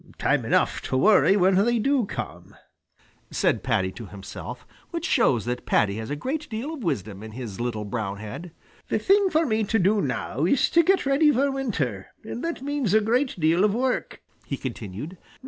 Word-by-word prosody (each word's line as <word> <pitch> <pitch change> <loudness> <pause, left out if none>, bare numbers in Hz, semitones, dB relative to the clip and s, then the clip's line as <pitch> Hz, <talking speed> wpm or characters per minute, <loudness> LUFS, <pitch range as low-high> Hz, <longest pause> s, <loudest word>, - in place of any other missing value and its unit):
Time - - +1
enough - - +1
to 130 - -2
worry 200 +4 +5
when 190 0 +4
they 240 +1 +2
do 260 -1 +1
come," - - -7 0.7
said - - +1
Paddy 95 0 0
to 115 +2 -9
himself, 105 +5 -8 0.2
which 335 -1 -4
shows 125 - +2
that 125 +1 -4
Paddy 100 0 +2
has 110 0 -5
a 145 - -2
great 295 - -4
deal 240 +8 -4
of 285 -7 -7
wisdom 105 - -3
in 110 0 -9
his 115 -5 -7
little 115 -3 -2
brown 100 -2 -3
head. 110 - -8 0.4
"The - - 0
thing 395 0 +3
for 320 -1 +2
me 220 -3 +1
to 225 +2 +1
do 200 +2 +3
now 135 +1 -2
is 240 +9 +2
to 335 - +6
get 380 +1 +2
ready 285 +3 +4
for 275 +1 +2
winter, 160 - -2 0.2
and 225 +2 -6
that 335 -5 -3
means 280 -8 0
a - - +7
great 245 +1 0
deal 165 +4 +3
of 210 0 +3
work," 255 +1 -2 0.2
he 140 - -4
continued. 125 - -6
190 Hz, 195 wpm, -25 LUFS, -, 0.7 s, a